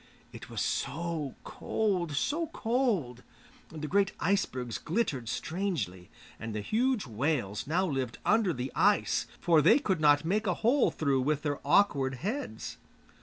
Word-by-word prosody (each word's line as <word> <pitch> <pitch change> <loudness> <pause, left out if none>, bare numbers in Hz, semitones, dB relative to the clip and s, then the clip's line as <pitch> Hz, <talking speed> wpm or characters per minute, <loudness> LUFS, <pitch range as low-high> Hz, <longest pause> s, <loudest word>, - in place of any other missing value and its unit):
It - - -10
was - - -2
so 165 -5 -2
cold, 185 -8 -1
so 315 - 0
cold; 220 - -1 0.5
the 155 -1 -6
great 195 +3 +2
icebergs 130 - -1
glittered 150 - -1
strangely, 155 - -3 0.3
and 110 -1 -5
the 105 - -2
huge 240 - 0
whales 120 -3 -2
now 175 +5 +1
lived 135 -7 -2
under 215 -3 +3
the 130 -3 -4
ice, 205 +1 +2
for 165 -4 +4
they - - +6
could 190 - -1
not 145 0 +5
make 210 +5 0
a 180 - +1
hole 255 +3 +4
through 140 -4 0
with 150 +2 0
their 145 -2 -1
awkward 140 -5 +3
heads. 215 - -4
160 Hz, 145 wpm, -30 LUFS, 130-200 Hz, 0.5 s, they